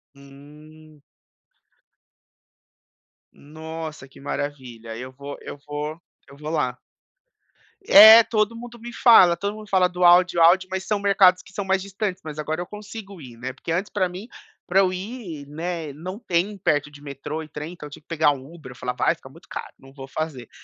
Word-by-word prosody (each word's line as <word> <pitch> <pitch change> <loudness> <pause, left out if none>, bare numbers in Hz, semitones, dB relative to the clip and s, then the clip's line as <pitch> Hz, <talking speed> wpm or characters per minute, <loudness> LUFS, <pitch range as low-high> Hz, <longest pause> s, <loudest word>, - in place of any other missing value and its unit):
Hum. 150 +2 -16 2.3
Nossa, 155 -1 -9
que 135 - -18
maravilha, 130 -6 -6
eu 130 +2 -8
vou 140 +2 -9
eu - - -8
vou 150 +3 -5 0.3
eu 140 - -15
vou 150 +1 -7
lá. 135 -6 -1 1.1
É, 220 +3 +10
todo 215 0 0
mundo 240 0 -10
me 240 +1 -8
fala. 185 -9 +6
Todo 200 +3 -3
mundo 215 -1 -11
fala 185 -2 +4
do 180 0 -3
Aldi, 175 0 +6
o - - +3
Aldi, 185 +3 +5
mas 190 0 -3
são 210 -1 0
mercados 195 -2 +4
que - - -17
são 200 - -3
mais 190 0 +1
distantes, 195 -1 -4
mas 155 -1 -7
agora 155 +3 -3
eu 175 - -4
consigo 205 -2 -10
ir, 120 -3 -12
né, 130 +2 -6
porque 165 - -7
antes 185 +5 -1
pra 185 -3 0
mim, 185 +5 -9 0.4
pra 190 +2 +2
eu 185 -2 +3
ir, 185 - -7
né, 160 0 -5
não 180 +6 -7
tem 195 0 -1
perto 150 -5 0
de 145 0 -15
metrô 145 +2 -6
e - - -12
trem, 150 +3 -7
então 150 -4 -10
eu - - -15
tinha 145 - -11
que - - -47
pegar 160 -3 +2
um 140 +3 -8
Uber, 155 -7 -11
eu - - -12
falava: 125 0 -4
"Ai, - - +3
fica - - -15
muito - - -18
caro, - - -7
não 135 0 -17
vou 135 -1 -10
fazer". 135 -5 -5
160 Hz, 195 wpm, -23 LUFS, 145-190 Hz, 2.3 s, É